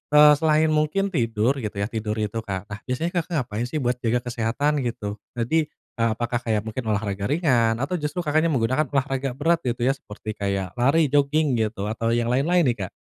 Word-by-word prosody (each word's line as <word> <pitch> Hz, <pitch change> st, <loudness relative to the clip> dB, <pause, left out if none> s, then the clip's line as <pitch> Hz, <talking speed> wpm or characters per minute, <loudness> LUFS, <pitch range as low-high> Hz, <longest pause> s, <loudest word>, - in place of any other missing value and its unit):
eee, 150 Hz, 0 st, +9 dB
selain 155 Hz, 0 st, +3 dB
mungkin 155 Hz, +6 st, +1 dB
tidur 120 Hz, -, +1 dB
gitu 105 Hz, -3 st, -5 dB
ya, 100 Hz, +2 st, -2 dB
tidur 110 Hz, -1 st, -2 dB
itu, 110 Hz, +1 st, -2 dB
Kak, 100 Hz, -1 st, -5 dB
nah, 100 Hz, -, -5 dB
biasanya 160 Hz, +8 st, -1 dB
Kakak 170 Hz, -, -6 dB
ngapain 115 Hz, +2 st, -4 dB
sih 145 Hz, +1 st, -3 dB
buat 125 Hz, 0 st, 0 dB
jaga 120 Hz, +1 st, 0 dB
kesehatan 125 Hz, +5 st, 0 dB
gitu? 105 Hz, -4 st, -4 dB, 0.2 s
Jadi 150 Hz, +7 st, +1 dB, 0.3 s
apakah 115 Hz, +1 st, 0 dB
kayak 110 Hz, -3 st, -1 dB
mungkin 110 Hz, +4 st, -4 dB
olahraga 100 Hz, -1 st, -1 dB
ringan 125 Hz, -8 st, +2 dB
atau 135 Hz, +8 st, -2 dB
justru 150 Hz, +4 st, -3 dB
Kakaknya 155 Hz, +2 st, +2 dB
menggunakan 130 Hz, +2 st, +1 dB
olahraga 135 Hz, -1 st, -1 dB
berat 165 Hz, +3 st, +2 dB
gitu 120 Hz, -1 st, -1 dB
ya 135 Hz, -, +3 dB
seperti 110 Hz, -4 st, -8 dB
kayak 100 Hz, -2 st, -2 dB
lari, 140 Hz, +6 st, +3 dB
joging, 145 Hz, 0 st, +2 dB
gitu 110 Hz, -3 st, -1 dB
atau 115 Hz, +1 st, -1 dB
yang 120 Hz, 0 st, +1 dB
lain-lain 165 Hz, +7 st, +3 dB
nih, 120 Hz, -3 st, +1 dB
Kak? -, -, -17 dB
125 Hz, 195 wpm, -24 LUFS, 110-150 Hz, 0.3 s, eee